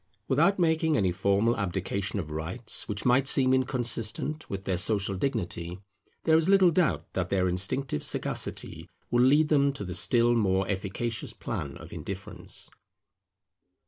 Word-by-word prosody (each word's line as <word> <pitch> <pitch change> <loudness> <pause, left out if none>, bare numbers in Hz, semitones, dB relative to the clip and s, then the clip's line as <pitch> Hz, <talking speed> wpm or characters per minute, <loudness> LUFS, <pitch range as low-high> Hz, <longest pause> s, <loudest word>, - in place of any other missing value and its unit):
Without 195 0 +3
making 160 -3 +2
any 95 -5 +2
formal 100 +5 +1
abdication 95 0 -2
of 80 -6 -4
rights, 85 +10 -1
which 100 -1 -3
might 130 +2 +3
seem 130 -2 +5
inconsistent 125 +3 0
with 95 -1 -5
their 95 - 0
social 100 +2 0
dignity, 90 -6 -3 0.5
there 160 - +4
is 165 +3 +3
little 190 -3 +6
doubt 170 -1 0
that 95 -1 -2
their 95 -1 +1
instinctive 95 - 0
sagacity - - -3 0.2
will 120 +1 +3
lead 145 +4 +4
them 140 -2 +3
to 135 - -6
the 90 -2 -5
still 120 +6 +2
more 95 -4 +1
efficacious 100 +3 -3
plan - - -5
of - - -11
indifference. - - -7
115 Hz, 145 wpm, -28 LUFS, 95-140 Hz, 0.5 s, little